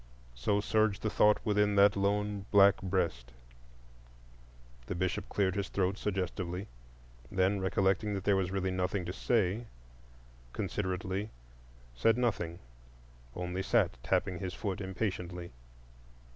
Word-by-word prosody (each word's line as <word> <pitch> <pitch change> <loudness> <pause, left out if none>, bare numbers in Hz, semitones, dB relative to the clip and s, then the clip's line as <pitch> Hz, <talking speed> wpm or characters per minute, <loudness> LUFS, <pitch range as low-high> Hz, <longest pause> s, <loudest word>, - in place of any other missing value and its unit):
So 80 +13 0
surged 110 -1 +1
the 110 - 0
thought 105 0 +5
within 105 -1 +2
that 100 0 +6
lone 100 0 0
black 100 -1 +6
breast. 85 -11 -1 1.6
The - - -3
Bishop 90 -1 -2
cleared 95 -2 +1
his 100 0 -2
throat 95 -1 0
suggestively; 95 -1 -3 0.7
then, 95 +2 +2
recollecting 95 +2 +1
that 95 - -4
there 100 - +3
was 95 -2 0
really 95 -1 -1
nothing 90 0 -1
to 90 - -4
say, 110 +1 0 0.9
considerately 95 0 -2 0.6
said 110 - +3
nothing, 95 -9 -1 0.8
only 90 +1 -3
sat 95 - +2
tapping 90 +5 0
his 95 -2 -4
foot 100 -2 -3
impatiently. 90 -3 -4
95 Hz, 120 wpm, -32 LUFS, 90-105 Hz, 1.6 s, that